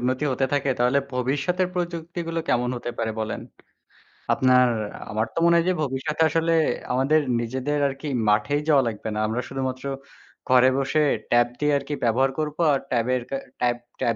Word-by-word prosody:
উন্নতি 130 +4 0
হতে 135 +1 0
থাকে, 140 -1 +1
তাহলে 125 +3 +3 0.2
ভবিষ্যতের 145 +9 0
প্রযুক্তিগুলো 170 -1 -3
কেমন 125 0 +1
হতে 120 - -4
পারে 110 -1 -1
বলেন? 110 0 -3 0.9
আপনার, 125 -1 +4 0.4
আমার 110 +2 0
তো - - -1
মনে 170 0 +5
হয় 170 - +2
যে, - - +3
ভবিষ্যতে 145 +4 -2
আসলে 165 +1 +1 0.4
আমাদের 140 +5 +3 0.2
নিজেদের 130 +5 -2
আর 135 - -3
কি 155 - -5 0.2
মাঠেই 105 +8 +2
যাওয়া 140 -3 +5
লাগবে 110 -1 -5
না। - - -1
আমরা 115 +3 -1
শুধুমাত্র 130 0 -4 0.6
ঘরে 130 0 +6
বসে, 140 +3 +1 0.3
ট্যাব 120 0 +5
দিয়ে 150 0 +2
আর - - -4
কি 150 - -3
ব্যবহার 130 +3 +2
করব। 150 -1 -2 0.2
আর 135 - +1
ট্যাবের 125 +1 +1
কা 135 - -2 0.2
ট্যাব, 120 -1 +2 0.2
ট্যাব 115 -1 +1
135 Hz, 175 wpm, -24 LUFS, 125-150 Hz, 0.9 s, ঘরে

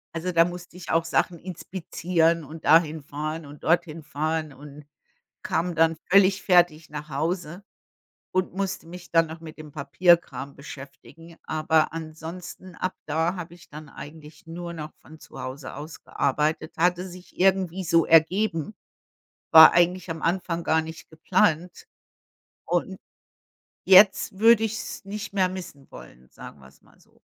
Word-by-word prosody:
Also, 180 +2 -2
da 165 -1 +5
musste 175 0 -8
ich 180 - -7
auch 165 0 +2
Sachen 170 +1 0
inspizieren 170 -2 -1
und 155 +2 -11
dahin 160 0 +4
fahren 155 +2 -6
und 145 0 -13
dorthin 165 -1 0
fahren 155 0 -3
und 145 +1 -13 0.6
kam 175 +2 -1
dann 165 0 +3
völlig 195 0 +5
fertig 175 -4 +3
nach 150 +1 -7
Hause 170 +5 -3 0.7
und 185 -1 0
musste 190 -3 -4
mich 180 +1 -11
dann 165 -1 +4
noch 160 - -8
mit 160 -2 -11
dem 155 -1 -10
Papierkram 170 -3 +1
beschäftigen, 145 +4 -12
aber 155 0 +1
ansonsten 165 +3 -8
ab 185 +2 -3
da 160 +4 0
habe 175 -1 -8
ich 175 - -18
dann 150 +1 -10
eigentlich 150 +4 -12
nur 170 +1 -6
noch 155 -2 -8
von 160 +1 -16
zu - - -12
Hause 130 +1 -7
aus 150 +2 -9
gearbeitet. 150 +3 -1
Hatte 180 +2 +1
sich 180 +1 -14
irgendwie 190 -1 +1
so 165 -1 +3
ergeben, 165 +3 +2 0.8
war 160 0 +10
eigentlich 175 +1 +2
am 160 -1 -6
Anfang 170 -1 -1
gar 160 0 +2
nicht 160 +1 -10
geplant. 165 +1 0 0.8
Und - - -2 0.9
jetzt 190 0 +6
würde 225 0 +6
ich 220 - -1
es - - -7
nicht 210 +1 -7
mehr 185 -2 +2
missen 180 -7 -9
wollen, 60 +1 -14
sagen 75 - -12
wir 65 - -16
es - - -23
mal - - -25
so. - - -27
165 Hz, 155 wpm, -25 LUFS, 155-180 Hz, 0.9 s, war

